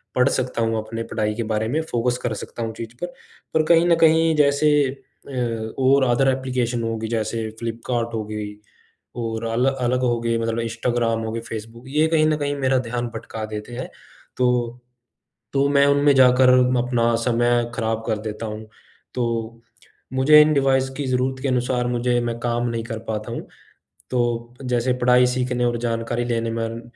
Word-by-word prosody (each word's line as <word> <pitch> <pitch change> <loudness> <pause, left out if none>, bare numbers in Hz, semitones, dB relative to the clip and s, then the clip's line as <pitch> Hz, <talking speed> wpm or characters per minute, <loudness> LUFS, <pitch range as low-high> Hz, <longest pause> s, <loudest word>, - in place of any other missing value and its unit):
पढ़ 125 +2 +4
सकता 125 -2 -1
हूँ, 115 0 +1
अपने 115 +1 -4
पढ़ाई 105 -1 0
के 115 - -2
बारे 110 +1 0
में 155 +6 0
फ़ोकस 125 +1 0
कर 120 -3 -1
सकता 115 - -6
हूँ 110 -1 -4
चीज़ 115 +1 -7
पर। 175 - -1 0.5
पर 155 - +3
कहीं 165 +1 +6
न 170 - +5
कहीं 160 0 +5
जैसे 145 +1 +3 0.2
अ 120 -4 -5
और 135 +1 +4
अदर 125 +2 +2
एप्लिकेशन 125 -3 -1
होगी, 115 -1 -2
जैसे 110 0 -2
फ़्लिपकार्ट 115 0 -3
हो 110 -1 -2
गई 105 -1 -5 0.7
और 115 -1 -3
अल 115 +3 +1
अलग 125 -1 -1
हो 120 -1 +1
गए, 115 0 0
मतलब 115 0 -1
इंस्टाग्राम 115 0 -1
हो 110 - -3
गए, 115 - -3
फ़ेसबुक, 115 +1 -8
ये 150 +3 +2
कहीं 160 -1 +3
न 155 -1 +1
कहीं 145 -1 -2
मेरा 130 -1 +2
ध्यान 120 0 -2
भटका 110 0 -6
देते 105 +2 -7
हैं 130 - -5 0.5
तो 125 -1 +1 0.8
तो 140 0 +3
मैं 140 0 +4
उनमें 140 0 +4
जाकर 130 0 +6 0.3
अपना 120 -1 +1
समय 120 0 +2
खराब 110 0 -1
कर 110 - 0
देता 110 +1 -5
हूँ। 110 0 -6 0.5
तो 115 -1 -2 0.5
मुझे 150 +3 +7
इन 155 0 +4
डिवाइस 135 -2 +2
की 145 - -2
ज़रूरत 130 +1 0
के - - 0
अनुसार 125 -1 0
मुझे 120 0 +1
मैं 120 -1 -2
काम 120 0 -1
नहीं 115 -1 -3
कर 115 -2 -5
पाता 110 +1 -3
हूँ, - - -6 0.6
तो 120 -1 -1
जैसे 125 0 0
पढ़ाई, 125 0 +5
सीखने 125 -1 0
और 120 0 0
जानकारी 120 0 -2
लेने 115 -1 -1
मन 115 0 -3
120 Hz, 180 wpm, -22 LUFS, 115-130 Hz, 0.8 s, मुझे